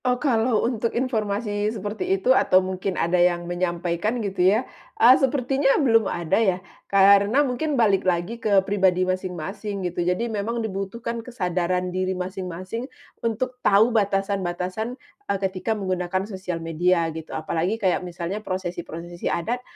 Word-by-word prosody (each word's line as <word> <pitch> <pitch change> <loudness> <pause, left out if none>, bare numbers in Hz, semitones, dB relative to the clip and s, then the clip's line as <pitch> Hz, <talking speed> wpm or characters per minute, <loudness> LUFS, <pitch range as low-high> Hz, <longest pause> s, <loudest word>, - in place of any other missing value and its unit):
Oh, 250 0 +2
kalau 235 -4 +1
untuk 230 -1 -1
informasi 210 -4 -1
seperti 205 -2 -2
itu, 250 +7 +3
atau 185 - +4
mungkin 185 0 -1
ada 175 +1 +2
yang 175 -1 +2
menyampaikan 175 +4 -1
gitu 195 -2 -2
ya, 220 +6 +2 0.3
eee, 240 +3 +8
sepertinya 270 +1 +2
belum 225 -7 +3
ada 175 +5 0
ya, 190 -5 +2 0.3
karena 200 +7 +5
mungkin 280 +3 -1
balik 205 -5 +3
lagi 185 +6 -1
ke 200 -3 +3
pribadi 190 -2 +2
masing-masing 185 +2 -4
gitu. 175 0 -2
Jadi 180 +6 0
memang 225 +1 -2
dibutuhkan 220 +4 -4
kesadaran 180 -5 -2
diri 185 0 -1
masing-masing 185 +5 -5 0.3
untuk 250 +3 -2
tahu 215 +4 +4
batasan-batasan, 195 +1 -1 0.3
eee, 200 - +1
ketika 195 +3 -2
menggunakan 185 -1 -2
sosial 185 -4 -5
media 170 +1 +2
gitu, 160 0 -8
apalagi 165 +6 -1
kayak 190 -5 +1
misalnya 180 +3 -5
prosesi-prosesi 175 -3 -5
adat, 235 +9 -2
195 Hz, 140 wpm, -24 LUFS, 180-225 Hz, 0.3 s, eee